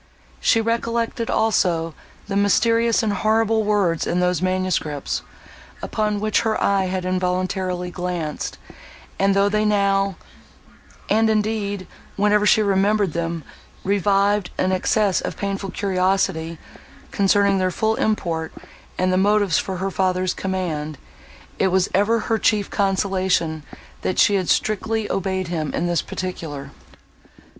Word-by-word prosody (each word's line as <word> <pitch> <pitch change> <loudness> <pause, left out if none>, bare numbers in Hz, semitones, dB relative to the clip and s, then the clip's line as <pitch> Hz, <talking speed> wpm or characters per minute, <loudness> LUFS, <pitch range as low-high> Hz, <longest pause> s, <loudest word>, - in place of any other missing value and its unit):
—She 225 - +3
recollected 230 0 -1
also 170 -7 +1 0.3
the 200 - -4
mysterious 230 +4 +3
and 210 -2 +1
horrible 220 +2 +2
words 200 -6 +1
in 175 - 0
those 180 -2 +1
manuscripts, 185 -6 -1 0.6
upon 210 -1 -1
which 215 0 +1
her 220 -1 0
eye 195 -1 +2
had 185 0 -3
involuntarily 185 0 -1
glanced; 175 -4 -4 0.6
and, 195 0 +3
though 200 0 +4
they 210 +1 +1
now, 200 -2 +2 0.9
and, 220 +1 +3
indeed, 210 -3 -1 0.3
whenever 210 +1 +3
she 215 0 +5
remembered 200 -2 +2
them, 165 -1 -3 0.4
revived 200 0 +2
an 185 - +1
excess 195 +1 +1
of - - -5
painful 195 -1 -3
curiosity, 185 -4 0 0.5
concerning 200 0 +3
their 185 0 +1
full 220 +5 0
import, 170 -7 -1 0.5
and 185 0 +1
the - - +2
motives 205 -2 +3
for 190 -1 -4
her 195 +1 -2
father's 185 -1 0
command, 165 -6 -3 0.6
it 195 - +3
was 190 0 +2
ever 215 +4 +2
her 225 +1 0
chief 210 -1 +1
consolation, 190 -5 0 0.4
that 185 - -2
she 205 - +5
had 190 -3 0
strictly 220 +1 0
obeyed 190 -2 -2
him 155 -4 -2
in - - -1
this 175 -1 +1
particular. 150 -7 -6
195 Hz, 130 wpm, -22 LUFS, 180-210 Hz, 0.9 s, she